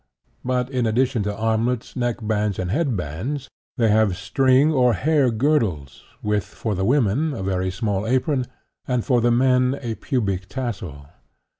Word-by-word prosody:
But, 125 0 -1
in 125 -3 0
addition 125 +1 +1
to 105 +1 -1
armlets, 115 +2 -1
neck 120 -2 -1
bands 105 -2 0
and 90 -1 -2
head 135 -3 0
bands, 105 - -4 0.3
they 115 -3 +3
have 105 -4 +3
string 135 +3 +3
or 125 -5 +3
hair 145 -1 +2
girdles, 110 - 0 0.2
with, 105 -2 +1
for 110 - -4
the 95 0 -2
women, 135 +5 +1
a 95 - -5
very 95 -1 -1
small 100 +1 -2
apron 130 +1 +1 0.4
and, 125 -3 0
for 125 -4 +2
the 120 - +3
men, 125 +2 +3
a 120 -3 -4
pubic 100 -8 -2
tassel. 95 - -5
120 Hz, 160 wpm, -22 LUFS, 105-130 Hz, 0.4 s, they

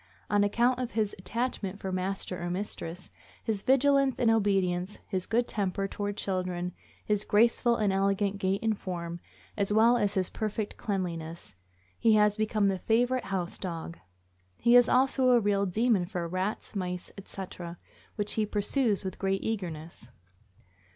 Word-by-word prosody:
On 205 0 +4
account 240 +5 +2
of 250 -2 -3
his 215 -2 0
attachment 205 -2 -3
for 190 - -4
master 185 0 -3
or 175 - -2
mistress, 180 -2 -5 0.3
his 215 -3 -1
vigilance 275 +1 +3
and 230 -2 +4
obedience, 195 -3 +1
his 185 -3 -2
good 235 +1 +1
temper 195 -1 -1
toward 205 +1 -4
children, 180 -2 -2 0.3
his 210 -1 +1
graceful 235 +3 +3
and 210 -4 +1
elegant 195 +1 +1
gait 195 +3 0
and 220 -1 +2
form, 170 -3 -5 0.4
as 200 -1 0
well 230 +3 +5
as 205 -3 0
his 185 -2 0
perfect 215 -1 -3
cleanliness, 170 - -4 0.5
he 225 -1 +5
has 210 -1 +4
become 215 -1 +1
the 190 -1 0
favorite 245 +5 +1
house 190 -3 -3
dog. 170 -2 -5 0.6
He 240 +1 +4
is 245 -1 +7
also 260 0 +3
a 245 -1 +6
real 200 -2 +1
demon 215 0 +2
for 175 -2 -3
rats, 185 +5 -3
mice, 180 -2 -3
etc., 185 -3 -8 0.4
which 205 -1 -1
he 220 - +1
pursues 210 0 +1
with 185 - -5
great 195 0 0
eagerness. 170 - -5
200 Hz, 155 wpm, -29 LUFS, 185-225 Hz, 0.6 s, is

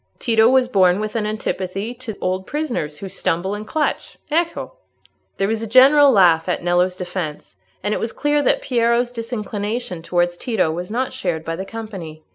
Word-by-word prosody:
Tito 225 -1 +4
was 260 -1 +4
born 190 -5 +3
with 215 +1 -4
an 215 -2 0
antipathy 205 0 -3
to 240 -4 -8
old 185 +1 -2
prisoners 245 - -3
who 195 - -7
stumble 185 0 -1
and 210 +1 -6
clutch. 310 +3 -2
Ecco!" 335 +9 -1 0.6
There 195 - +1
was 220 +1 -1
a 225 - -4
general 275 +5 +7
laugh 175 -6 +4
at 175 - -1
Nello's 180 +1 +2
defence, 175 - -5 0.3
and 205 - 0
it - - -1
was 225 - -2
clear 295 0 +1
that 285 - +1
Piero's 240 0 +1
disinclination 215 -4 -4
towards 175 +1 0
Tito 205 -9 0
was 175 +2 -5
not 250 +4 -2
shared 165 -3 -3
by 165 - -2
the 190 - -5
company. 195 -9 -8
210 Hz, 180 wpm, -20 LUFS, 180-240 Hz, 0.6 s, general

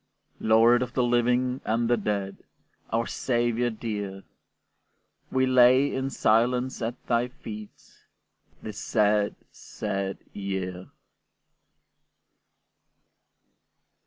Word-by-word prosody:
Lord 115 +2 +5
of 125 -2 -3
the 125 - +1
living 125 +1 +1
and 115 +2 0
the 120 - +4
dead, 100 -3 -2 0.5
Our 115 +1 0
Saviour 120 -1 0
dear! 105 -4 -5 1.1
We 130 0 +2
lay 130 +2 +5
in 130 0 -2
silence 125 +2 +1
at 115 +2 -2
thy 120 +1 +1
feet 110 -4 -11 0.6
This 105 -1 -6
sad, 105 -2 +1 0.2
sad 100 -2 -4 0.2
year! 95 -2 -4
115 Hz, 90 wpm, -26 LUFS, 105-125 Hz, 1.1 s, Lord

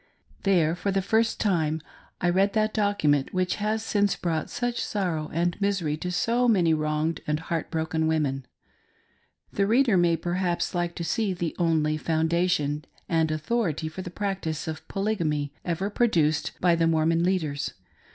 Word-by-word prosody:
There, 170 -5 +3
for 200 - -2
the 195 -1 +1
first 220 +3 +1
time, 160 -6 +1 0.4
I 175 - +2
read 195 +3 +2
that 215 0 +1
document 185 -10 +1
which 185 -1 0
has 215 +1 -1
since 205 -2 +1
brought 160 -3 -2
such 245 -1 -2
sorrow 170 -7 -2
and 175 +4 -1
misery 190 -7 0
to 180 +3 -4
so 235 +6 +1
many 180 -8 +4
wronged 155 +1 -1
and 150 0 0
heart 165 0 -3
broken 160 -1 -1
women. 140 -5 0 1.1
The 200 -1 +1
reader 235 -2 +4
may 170 -1 +3
perhaps 175 +1 -1
like 175 -1 -1
to 170 - -4
see 205 +3 0
the 175 -2 -3
only 155 -3 +2
foundation 160 -2 0 0.2
and 160 -2 +2
authority 160 0 -1
for 160 +4 -6
the 180 - -6
practice 180 -5 -3
of 160 0 -6
Polygamy, 165 -9 -1
ever 185 +4 -2
produced 165 -10 +1
by 175 -1 +4
the 165 -1 +2
Mormon 165 +1 +2
leaders. 160 - -1
170 Hz, 160 wpm, -26 LUFS, 160-195 Hz, 1.1 s, many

